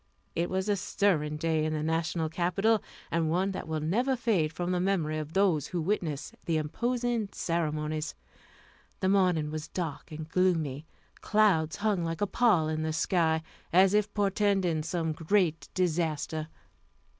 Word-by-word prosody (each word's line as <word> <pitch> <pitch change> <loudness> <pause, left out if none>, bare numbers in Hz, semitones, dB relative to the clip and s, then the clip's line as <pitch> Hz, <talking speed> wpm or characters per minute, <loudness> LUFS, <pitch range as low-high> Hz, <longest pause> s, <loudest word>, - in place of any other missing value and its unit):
It 170 +1 0
was 190 +1 -1
a 205 - +2
stirring 165 -6 0
day 160 0 +1
in 155 0 0
the 155 -1 -2
National 160 0 0
Capital, 185 +7 +1 0.3
and 165 -1 +1
one 185 +4 +1
that 190 - -5
will 160 -1 -2
never 240 - +1
fade 205 -11 +1
from 175 +3 -3
the 180 - +1
memory 170 -5 0
of 155 +1 -6
those 190 -7 +2
who 175 - -3
witnessed 160 -5 -2
the 165 -2 +1
imposing 235 +7 -1
ceremonies. 155 -2 -2 0.9
The 190 - +2
morning 180 -6 +2
was 155 +1 -4
dark 165 -6 -5
and 155 0 -6
gloomy; 165 -5 0 0.3
clouds 195 -8 +3
hung 205 -4 0
like 165 0 -3
a - - +4
pall 200 -7 +3
in 155 0 -1
the 160 0 -1
sky, 160 -1 +1 0.3
as 185 +3 +5
if 210 0 +2
portending 195 -5 +1
some 165 0 -2
great 165 +1 0
disaster. 160 -3 -1
170 Hz, 155 wpm, -29 LUFS, 155-195 Hz, 0.9 s, as